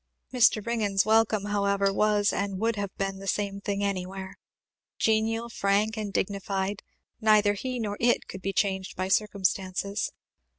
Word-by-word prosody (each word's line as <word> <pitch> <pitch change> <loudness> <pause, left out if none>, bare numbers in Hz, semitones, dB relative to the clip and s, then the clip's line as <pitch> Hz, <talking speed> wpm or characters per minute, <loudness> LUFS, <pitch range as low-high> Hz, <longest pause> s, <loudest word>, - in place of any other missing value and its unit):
Mr. 225 -4 +4
Ringgan's 210 -5 +1
welcome, 220 -1 +3
however, 200 -1 +1
was 210 0 +2
and 200 -1 -2
would 225 +3 0
have 200 -1 -3
been 195 -1 -2
the 195 - -8
same 200 0 -1
thing 200 0 -2
anywhere 190 -1 -3 0.6
genial, 225 +1 +1
frank, 210 0 +1
and 215 -2 -4
dignified; 195 0 -2 0.4
neither 215 -1 +4
he 255 +5 -4
nor 205 -2 -3
it 240 +1 +2
could 190 - -8
be 195 - -1
changed 190 -1 -1
by 185 +1 -2
circumstances. 200 0 0
200 Hz, 145 wpm, -27 LUFS, 195-215 Hz, 0.6 s, Mr